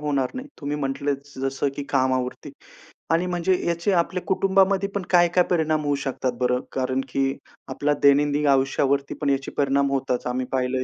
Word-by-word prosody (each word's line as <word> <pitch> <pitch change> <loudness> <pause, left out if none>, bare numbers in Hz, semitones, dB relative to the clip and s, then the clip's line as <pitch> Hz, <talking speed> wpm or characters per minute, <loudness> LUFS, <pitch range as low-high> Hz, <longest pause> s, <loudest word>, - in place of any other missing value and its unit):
होणार 140 -3 0
नाही. 260 +3 -6
तुम्ही 145 +1 -3
म्हंटलं 140 0 -1 0.2
जसं 135 +1 -1
की 145 - -3
कामावरती 130 -2 -1 0.6
आणि 170 +2 +2
म्हणजे 180 +1 +1
याचे 170 +3 0
आपल्या 180 0 +1
कुटुंबामध्ये 195 +1 +2
पण 200 - 0
काय 175 -1 +5
काय 180 - +6
परिणाम 155 -3 +1
होऊ 145 - +1
शकतात 130 -1 -1
बरं? 125 0 +1
कारण 130 0 -1
की 135 +1 0 0.3
आपल्याला 145 0 -1
दैनंदिन 145 +1 +4
आयुष्यावरती 140 0 +2
पण 145 - +1
याचे 135 -1 -1
परिणाम 140 0 +2
होताच, 135 -2 -1
आम्ही 125 +1 -2
पाहिलंय. 130 0 0
140 Hz, 165 wpm, -24 LUFS, 135-170 Hz, 0.6 s, काय